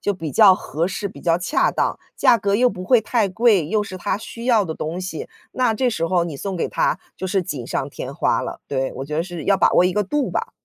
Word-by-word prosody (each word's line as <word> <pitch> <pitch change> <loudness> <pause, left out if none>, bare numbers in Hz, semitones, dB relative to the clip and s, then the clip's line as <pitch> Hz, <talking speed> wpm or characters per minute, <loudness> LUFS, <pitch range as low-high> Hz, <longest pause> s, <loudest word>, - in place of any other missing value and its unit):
就 205 - -1
比 165 -5 -5
较 200 0 +7
合 165 -1 -3
适， 200 +2 -3
比 195 - -13
较 170 -1 +2
恰 180 - +1
当， - - -1 0.2
价 235 - +5
格 200 -1 0
又 250 +3 +4
不 185 -3 -7
会 245 +3 +4
太 220 -3 0
贵， 205 -5 +3
又 215 +4 +1
是 190 -2 -7
他 185 - -1
需 230 +2 -9
要 230 -5 +3
的 160 -3 -4
东 165 +4 -4
西， 185 -4 -5 0.2
那 250 -3 +1
这 255 +1 +1
时 165 -7 -1
候 180 -1 +2
你 165 -5 -4
送 195 +5 -4
给 170 - -1
他 175 - 0 0.2
就 190 - -4
是 190 0 0
锦 140 -9 -5
上 135 +2 -3
添 135 +1 -7
花 165 - +1
了， - - -6
对。 135 -1 -1
我 135 - -5
觉 150 +2 -4
得 165 - 0
是 175 -4 -7
要 195 -1 +3
把 - - +3
握 180 - +5
一 180 - +2
个 210 +1 0
度 295 +6 -1
吧。 - - -3
185 Hz, 285 characters per minute, -21 LUFS, 165-215 Hz, 0.2 s, 较